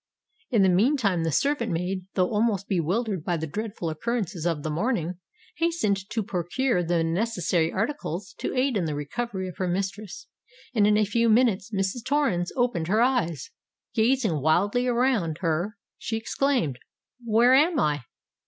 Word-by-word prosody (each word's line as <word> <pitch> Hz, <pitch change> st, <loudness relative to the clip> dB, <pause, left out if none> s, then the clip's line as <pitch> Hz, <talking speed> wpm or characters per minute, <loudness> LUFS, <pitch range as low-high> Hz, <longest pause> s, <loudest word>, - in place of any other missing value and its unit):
In 220 Hz, -5 st, +3 dB
the -, -, +5 dB
meantime 200 Hz, -, +2 dB
the 165 Hz, -, 0 dB
servant 235 Hz, -, +1 dB
maid, 180 Hz, +2 st, -2 dB
though 180 Hz, -1 st, +2 dB
almost 210 Hz, -3 st, +1 dB
bewildered 190 Hz, +1 st, -1 dB
by 175 Hz, 0 st, 0 dB
the 160 Hz, -, -3 dB
dreadful 205 Hz, +2 st, -4 dB
occurrences 190 Hz, -1 st, -2 dB
of 160 Hz, -4 st, -1 dB
the 155 Hz, -, -2 dB
morning, 180 Hz, -1 st, -1 dB, 0.4 s
hastened 215 Hz, -, 0 dB
to 225 Hz, -, -1 dB
procure 190 Hz, +3 st, 0 dB
the 170 Hz, -1 st, +1 dB
necessary 175 Hz, -2 st, 0 dB
articles 195 Hz, -, -3 dB
to -, -, -3 dB
aid 255 Hz, -2 st, +2 dB
in 180 Hz, -, 0 dB
the 150 Hz, -2 st, -2 dB
recovery 190 Hz, +6 st, -4 dB
of 180 Hz, -, -9 dB
her 185 Hz, -, -1 dB
mistress; 190 Hz, +1 st, -4 dB, 0.5 s
and 210 Hz, -4 st, +4 dB
in 210 Hz, 0 st, +4 dB
a 215 Hz, -, +3 dB
few 230 Hz, +3 st, +1 dB
minutes 220 Hz, -4 st, +3 dB
Mrs. 195 Hz, +2 st, -2 dB
Torrens 265 Hz, -12 st, 0 dB
opened 240 Hz, -11 st, 0 dB
her 210 Hz, +4 st, +2 dB
eyes. 170 Hz, -, 0 dB, 0.4 s
Gazing 225 Hz, -, +2 dB
wildly 200 Hz, -, +2 dB
around 235 Hz, -10 st, +1 dB
her, 175 Hz, +5 st, -1 dB, 0.2 s
she 225 Hz, -, -2 dB
exclaimed, 225 Hz, -, 0 dB, 0.4 s
"Where 235 Hz, +2 st, +4 dB
am 305 Hz, +5 st, +4 dB
I?" 145 Hz, -, 0 dB
200 Hz, 160 wpm, -26 LUFS, 175-235 Hz, 0.5 s, the